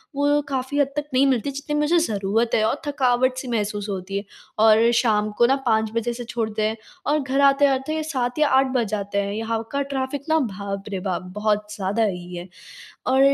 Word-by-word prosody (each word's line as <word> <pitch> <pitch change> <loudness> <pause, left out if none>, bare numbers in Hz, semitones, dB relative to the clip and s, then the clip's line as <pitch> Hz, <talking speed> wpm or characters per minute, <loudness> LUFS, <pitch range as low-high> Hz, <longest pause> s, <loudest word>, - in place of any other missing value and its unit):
वो 290 +1 +2
काफ़ी 270 +1 -2
हद 285 - +4
तक 295 0 -2
नहीं 260 +2 +4
मिलती 265 +1 +1
जितनी 285 +2 -4
मुझे 300 +4 +3
ज़रूरत 220 - 0
है 215 - +3
और 250 +6 -1
थकावट-सी 255 -1 +1
महसूस 210 -3 -2
होती 195 0 -4
है, 200 - -3 0.4
और 225 +1 +6
शाम 215 -3 +2
को 240 - +5
ना 265 +3 +4
5 220 -1 +2
बजे 235 +1 -1
से 245 +1 -6
छोड़ते 225 -2 -3
हैं 220 +1 -3 0.3
और 300 +1 +2
घर 275 0 0
आते-आते 280 +2 +3
7 260 -3 -2
या 300 - +4
8 265 0 +4
बज 245 -3 +2
जाते 200 -1 -3
हैं। 200 0 -3
यहाँ 225 +1 -2
का 280 0 0
ट्रैफ़िक 275 0 -3
ना, 320 0 +4
बाप 200 -5 -4
रे 195 -2 -3
बाप! 185 -1 -2
बहुत 210 0 0
ज़्यादा 205 +2 0
ही 180 -3 -3
है, 175 +1 -7 0.6
और 265 +1 +3
235 Hz, 200 wpm, -23 LUFS, 210-275 Hz, 0.6 s, और